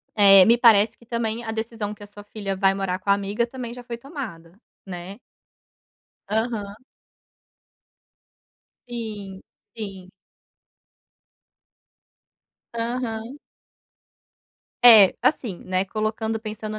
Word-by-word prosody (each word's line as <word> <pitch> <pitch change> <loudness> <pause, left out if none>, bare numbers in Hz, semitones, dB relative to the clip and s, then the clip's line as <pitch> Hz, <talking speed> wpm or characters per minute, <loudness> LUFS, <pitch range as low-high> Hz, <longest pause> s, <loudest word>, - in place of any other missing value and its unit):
Eh, 195 -2 +8
me 235 +1 +5
parece 225 -2 +5
que 235 - -21
também 230 0 -3
a 225 - -4
decisão 220 -1 -4
que 205 - -13
a - - -11
sua 205 0 -13
filha 205 -2 -5
vai 195 0 +3
morar 195 -1 -2
com 200 - -7
a - - +7
amiga 200 +4 -1
também 240 -1 -7
já 245 0 -10
foi 235 -1 -6
tomada, 235 - -9 0.3
né. 185 +1 -8 1.1
Aham. 215 -2 -2 2.1
Sim, 210 -5 -7 0.4
sim. 195 -4 -8 2.6
Aham. 235 +1 -4 1.4
É, 220 -6 +9
assim, 230 - 0
né, 185 +1 -1
colocando 220 +2 -3
pensando 215 0 -6
215 Hz, 105 wpm, -23 LUFS, 195-235 Hz, 2.6 s, É